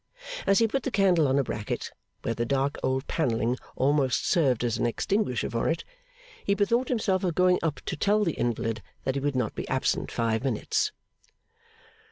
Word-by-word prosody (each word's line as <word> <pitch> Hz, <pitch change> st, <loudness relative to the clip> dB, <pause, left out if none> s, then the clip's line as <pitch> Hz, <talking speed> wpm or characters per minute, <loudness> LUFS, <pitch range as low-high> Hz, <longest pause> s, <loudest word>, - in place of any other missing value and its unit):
As 195 Hz, -, +5 dB
he 225 Hz, -, +4 dB
put 270 Hz, +5 st, -1 dB
the 250 Hz, -, -2 dB
candle 185 Hz, -, +3 dB
on 135 Hz, +1 st, +2 dB
a 140 Hz, -, +3 dB
bracket, 105 Hz, -4 st, -4 dB, 0.3 s
where 115 Hz, -, 0 dB
the 115 Hz, -, -1 dB
dark 140 Hz, +3 st, 0 dB
old 130 Hz, +1 st, 0 dB
panelling 120 Hz, -5 st, 0 dB, 0.2 s
almost 135 Hz, -1 st, +2 dB
served 135 Hz, -9 st, +2 dB
as 120 Hz, -2 st, 0 dB
an -, -, +2 dB
extinguisher 160 Hz, -, 0 dB
for 115 Hz, 0 st, -1 dB
it, 165 Hz, -, -1 dB, 0.6 s
he 200 Hz, -, +2 dB
bethought 235 Hz, +5 st, +2 dB
himself 200 Hz, -6 st, +1 dB
of 175 Hz, -4 st, 0 dB
going 180 Hz, 0 st, +4 dB
up 160 Hz, -3 st, -2 dB
to -, -, -2 dB
tell 210 Hz, +6 st, +2 dB
the 170 Hz, -, +1 dB
invalid 115 Hz, -2 st, -1 dB, 0.2 s
that 130 Hz, -, 0 dB
he 140 Hz, -, -2 dB
would 145 Hz, -1 st, -1 dB
not 120 Hz, -4 st, 0 dB
be -, -, -5 dB
absent -, -, 0 dB
five 115 Hz, 0 st, 0 dB
minutes. 130 Hz, -6 st, 0 dB
140 Hz, 190 wpm, -27 LUFS, 120-190 Hz, 0.6 s, As